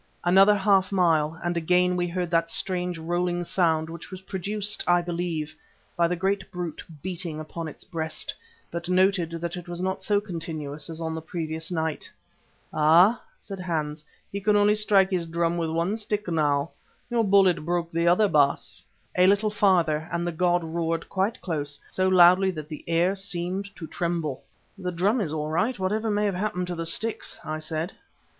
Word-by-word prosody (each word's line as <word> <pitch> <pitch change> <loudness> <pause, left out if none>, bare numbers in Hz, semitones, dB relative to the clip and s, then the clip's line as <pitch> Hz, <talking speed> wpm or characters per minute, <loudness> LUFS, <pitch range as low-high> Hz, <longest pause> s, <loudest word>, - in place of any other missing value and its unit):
Another 195 +4 +6
half 195 -1 +3
mile 165 -4 +2
and 175 0 -1
again 180 +2 +2
we 175 0 0
heard 175 0 -3
that 165 0 +2
strange 180 -1 -1
rolling 175 +2 -1
sound 160 -3 +1
which 165 0 -9
was 185 -1 -8
produced, 205 +2 -2
I 175 0 +5
believe, 170 -3 -3 0.4
by 170 -1 +3
the 180 - -1
great 195 +3 -1
brute 175 -3 -5 0.2
beating 175 -3 -4
upon 160 +1 -6
its 155 - -10
breast, 160 -3 -4 0.4
but 170 +1 -5
noted 185 -2 +3
that 170 +1 -4
it 180 0 -8
was 175 0 -4
not 190 +1 -2
so 205 -2 +2
continuous 160 -6 -5
as 165 0 -6
on 160 -1 -3
the 160 - -4
previous 160 0 -4
night. 160 -2 -2 0.6
"Ha!" 170 +9 +5 0.2
said 195 -2 -8
Hans, 155 -4 -3 0.3
"he 200 - -4
can 210 +1 +3
only 205 0 +5
strike 205 -2 +3
his 175 -3 0
drum 170 +1 0
with 165 -2 -1
one 170 +5 0
stick 210 -2 -3
now. 150 -3 +1 0.4
Your 235 -1 +2
bullet 195 -5 +4
broke 170 0 -1
the 170 +1 +1
other, 180 +5 +5
Baas." 145 -6 +1 0.3
A 180 0 +5
little 205 +2 +3
farther 175 -6 +2
and 170 0 -1
the 175 - -1
god 175 +1 +1
roared 165 0 -2
quite 195 +4 -1
close, 145 -4 -3
so 185 0 0
loudly 185 +1 +6
that 155 -4 -6
the 155 - -7
air 170 +3 +2
seemed 190 0 -3
to 165 - -7
tremble. 165 -5 -2 0.4
"The 180 -1 -3
drum 200 +8 +1
is 165 -7 -1
all 155 0 -3
right, 220 +10 +1
whatever 210 +4 -1
may 210 0 +1
have 200 - +1
happened 180 -1 -2
to 175 - -2
the 165 0 -3
sticks," 220 +6 -2
I 155 0 -3
said. 155 +3 -3
175 Hz, 185 wpm, -26 LUFS, 165-190 Hz, 0.6 s, Another